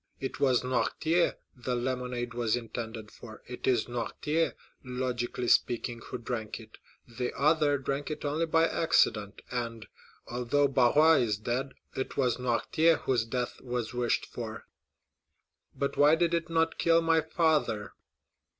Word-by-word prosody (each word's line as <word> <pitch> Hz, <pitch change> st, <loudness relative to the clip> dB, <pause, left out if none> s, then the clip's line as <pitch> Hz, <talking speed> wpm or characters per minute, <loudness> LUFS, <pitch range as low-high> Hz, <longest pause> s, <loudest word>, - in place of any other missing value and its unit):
It 135 Hz, -, -5 dB
was 130 Hz, -3 st, +3 dB
Noirtier 160 Hz, +6 st, +1 dB, 0.2 s
the 125 Hz, 0 st, -3 dB
lemonade 125 Hz, -1 st, -2 dB
was 120 Hz, -2 st, +1 dB
intended 115 Hz, -2 st, -6 dB
for—it 120 Hz, +2 st, -9 dB
is 125 Hz, -4 st, +3 dB
Noirtier, 150 Hz, +7 st, -1 dB, 0.3 s
logically 125 Hz, -1 st, -3 dB
speaking, 120 Hz, 0 st, +2 dB
who -, -, -4 dB
drank 115 Hz, -2 st, -4 dB
it. 110 Hz, -1 st, -14 dB, 0.3 s
The 125 Hz, +1 st, -3 dB
other 150 Hz, 0 st, +3 dB
drank 140 Hz, +2 st, -3 dB
it 150 Hz, -, -5 dB
only 155 Hz, +3 st, 0 dB
by 165 Hz, +1 st, +4 dB
accident, 105 Hz, -12 st, +1 dB
and, 115 Hz, -2 st, -3 dB, 0.4 s
although 125 Hz, +4 st, +1 dB
Barrois 145 Hz, +5 st, +5 dB
is 110 Hz, -3 st, 0 dB
dead, 125 Hz, +5 st, -3 dB, 0.2 s
it 130 Hz, -, -4 dB
was 125 Hz, -4 st, +2 dB
Noirtier 155 Hz, +7 st, +2 dB
whose 125 Hz, -4 st, +1 dB
death 125 Hz, +1 st, -3 dB
was 125 Hz, -2 st, -3 dB
wished 120 Hz, -1 st, 0 dB
for." -, -, -7 dB, 1.1 s
"But 140 Hz, -, -2 dB
why 145 Hz, +2 st, +6 dB
did 170 Hz, 0 st, +1 dB
it 170 Hz, -1 st, 0 dB
not 165 Hz, 0 st, +1 dB
kill 165 Hz, 0 st, +4 dB
my 165 Hz, 0 st, +3 dB
father?" 150 Hz, -, 0 dB
125 Hz, 140 wpm, -29 LUFS, 120-150 Hz, 1.1 s, why